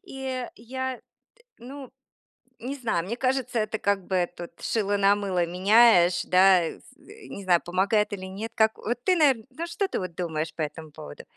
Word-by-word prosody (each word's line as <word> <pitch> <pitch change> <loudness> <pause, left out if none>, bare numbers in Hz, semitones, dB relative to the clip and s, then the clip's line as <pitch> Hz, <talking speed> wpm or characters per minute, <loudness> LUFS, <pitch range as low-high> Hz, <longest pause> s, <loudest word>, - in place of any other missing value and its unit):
И 265 -5 -5
я, 260 +2 -5 0.6
ну, 265 +1 -10 0.7
не 260 +4 -5
знаю, 225 -11 -1
мне 235 +5 -4
кажется, 255 -2 -1
это 215 0 -2
как 200 -2 0
бы 180 -2 0
тут 175 0 -8
шило 205 -2 0
на 200 0 +4
мыло 190 -4 -1
меняешь, 185 -1 +4
да, 185 0 +5
э, - - -6
з 255 - -21 0.3
не 200 - -8
знаю, 175 -2 +3
помогает 200 +4 +1
или 190 -2 -6
нет. 210 +4 -6
Как 220 0 +2
вот 240 +3 -3
ты, 370 - +3
наверное, 270 -7 +3
ну 330 +6 -5
что 390 +3 -2
ты, - - -3
вот, 180 -3 -6
думаешь 160 -2 -3
по 160 - -5
этому 155 +1 -5
поводу? 75 - -11
205 Hz, 185 wpm, -26 LUFS, 180-250 Hz, 0.7 s, да